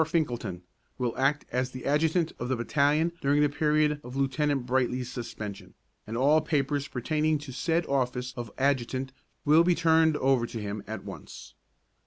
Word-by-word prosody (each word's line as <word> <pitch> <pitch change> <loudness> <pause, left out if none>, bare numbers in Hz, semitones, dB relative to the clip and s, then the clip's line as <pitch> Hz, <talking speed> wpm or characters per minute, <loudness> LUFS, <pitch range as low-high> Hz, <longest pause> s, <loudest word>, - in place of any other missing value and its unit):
Finkelton 120 - -2 0.3
will 125 -3 -1
act 140 +3 +1
as 125 +1 -1
adjutant 155 +5 +1
of 125 - -3
the 130 - +2
battalion 145 +7 +2
during 145 +2 +3
the 145 - +3
period 150 0 +1
of 125 +1 -9
Lieutenant 135 0 0
Brightly's 125 0 0
suspension, 105 -4 -7 0.3
and 115 +2 -4
all 145 +5 +4
papers 145 -1 0
pertaining 155 +4 0
to 145 -3 -9
said 165 +5 0
office 125 -2 -1
of 120 -2 -5
adjutant 130 -1 0 0.3
will 155 +3 +6
be 175 0 +3
turned 160 -2 +4
over 130 -4 +2
to 115 - -6
him 105 0 -4
at 110 +1 -5
once. - - -10
135 Hz, 160 wpm, -28 LUFS, 125-150 Hz, 0.3 s, will